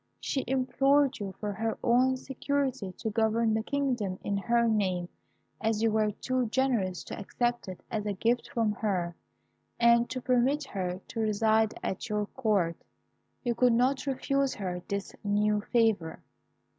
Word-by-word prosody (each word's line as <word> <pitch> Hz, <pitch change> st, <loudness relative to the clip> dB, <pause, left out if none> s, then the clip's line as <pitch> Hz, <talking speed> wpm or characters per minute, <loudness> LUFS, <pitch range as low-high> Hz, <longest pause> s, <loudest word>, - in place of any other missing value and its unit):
She 270 Hz, -, -2 dB
implored 270 Hz, +1 st, +2 dB
you, 195 Hz, -3 st, -5 dB
for 210 Hz, -1 st, -3 dB
her 225 Hz, +2 st, -2 dB
own 255 Hz, +2 st, +3 dB
security, 265 Hz, -5 st, -2 dB
to 220 Hz, +3 st, -4 dB
govern 225 Hz, 0 st, +2 dB
the 220 Hz, -, +1 dB
kingdom 245 Hz, -8 st, -1 dB
in 200 Hz, -, -1 dB
her 235 Hz, +4 st, +2 dB
name, 185 Hz, -5 st, 0 dB, 0.5 s
as 220 Hz, 0 st, 0 dB
you 225 Hz, -, +3 dB
were 215 Hz, 0 st, +2 dB
too 255 Hz, +4 st, -1 dB
generous 225 Hz, -7 st, 0 dB
to -, -, -7 dB
accept 240 Hz, +3 st, -1 dB
it 185 Hz, -1 st, -8 dB
as 210 Hz, -2 st, -2 dB
a 205 Hz, -, 0 dB
gift 235 Hz, +5 st, 0 dB
from 225 Hz, -3 st, +1 dB
her, 185 Hz, -5 st, -1 dB, 0.6 s
and 235 Hz, 0 st, +5 dB
to 255 Hz, -, -3 dB
permit 255 Hz, +4 st, +2 dB
her 185 Hz, -7 st, -3 dB
to 230 Hz, -, -5 dB
reside 220 Hz, 0 st, +2 dB
at 190 Hz, -, -3 dB
your 210 Hz, 0 st, 0 dB
Court. 205 Hz, -8 st, 0 dB, 0.7 s
You 240 Hz, -2 st, +1 dB
could 245 Hz, +1 st, +4 dB
not 260 Hz, +4 st, +2 dB
refuse 275 Hz, 0 st, 0 dB
her 180 Hz, -3 st, -4 dB
this 200 Hz, 0 st, -3 dB
new 210 Hz, 0 st, +2 dB
favour. 220 Hz, -9 st, +1 dB
225 Hz, 155 wpm, -29 LUFS, 205-255 Hz, 0.7 s, and